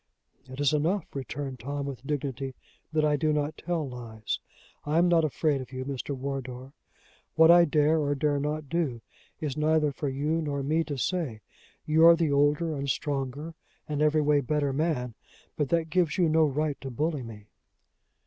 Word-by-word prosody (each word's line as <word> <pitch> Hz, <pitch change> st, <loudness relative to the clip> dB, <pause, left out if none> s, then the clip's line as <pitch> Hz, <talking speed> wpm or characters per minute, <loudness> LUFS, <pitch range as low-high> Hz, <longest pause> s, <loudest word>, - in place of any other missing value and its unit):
"It 130 Hz, +1 st, -9 dB
is 145 Hz, 0 st, +2 dB
enough," 165 Hz, +5 st, +1 dB
returned 135 Hz, -1 st, -5 dB
Tom 140 Hz, +3 st, -4 dB
with 135 Hz, -2 st, -7 dB
dignity, 135 Hz, -3 st, -3 dB, 0.4 s
"that 155 Hz, -1 st, +2 dB
I 150 Hz, -1 st, +2 dB
do 155 Hz, +2 st, +1 dB
not 150 Hz, 0 st, -1 dB
tell 165 Hz, -3 st, -2 dB
lies. 115 Hz, -4 st, -5 dB, 0.4 s
I 150 Hz, +2 st, 0 dB
am 175 Hz, +1 st, +5 dB
not 170 Hz, -2 st, +4 dB
afraid 150 Hz, -1 st, 0 dB
of 130 Hz, -1 st, -10 dB
you, 130 Hz, 0 st, -5 dB
Mr. 140 Hz, 0 st, -4 dB
Wardour. 130 Hz, -1 st, -5 dB, 0.6 s
What 160 Hz, +1 st, +7 dB
I 175 Hz, 0 st, +7 dB
dare 155 Hz, +1 st, +3 dB
or 145 Hz, -1 st, 0 dB
dare 145 Hz, 0 st, +1 dB
not 150 Hz, +1 st, -3 dB
do, 150 Hz, -7 st, -1 dB, 0.4 s
is 145 Hz, -4 st, -3 dB
neither 155 Hz, -1 st, +2 dB
for 140 Hz, +1 st, -3 dB
you 150 Hz, +5 st, -1 dB
nor 140 Hz, -3 st, -2 dB
me 155 Hz, +4 st, +1 dB
to 145 Hz, -, -4 dB
say. 135 Hz, -7 st, -2 dB, 0.4 s
You 160 Hz, +2 st, +6 dB
are 170 Hz, -, +9 dB
the 165 Hz, -3 st, 0 dB
older 145 Hz, +3 st, +2 dB
and 140 Hz, -1 st, -3 dB
stronger 140 Hz, +3 st, -2 dB, 0.3 s
and 150 Hz, -1 st, -2 dB
every 155 Hz, 0 st, +3 dB
way 145 Hz, -1 st, +3 dB
better 140 Hz, +1 st, 0 dB
man, 135 Hz, -5 st, -1 dB, 0.4 s
but 145 Hz, -3 st, -1 dB
that 165 Hz, -1 st, 0 dB
gives 175 Hz, -2 st, +1 dB
you 175 Hz, -3 st, +4 dB
no 160 Hz, 0 st, +4 dB
right 150 Hz, 0 st, -1 dB
to 135 Hz, -, -5 dB
bully 150 Hz, +3 st, -1 dB
me." 110 Hz, -3 st, -10 dB
145 Hz, 185 wpm, -28 LUFS, 135-155 Hz, 0.6 s, are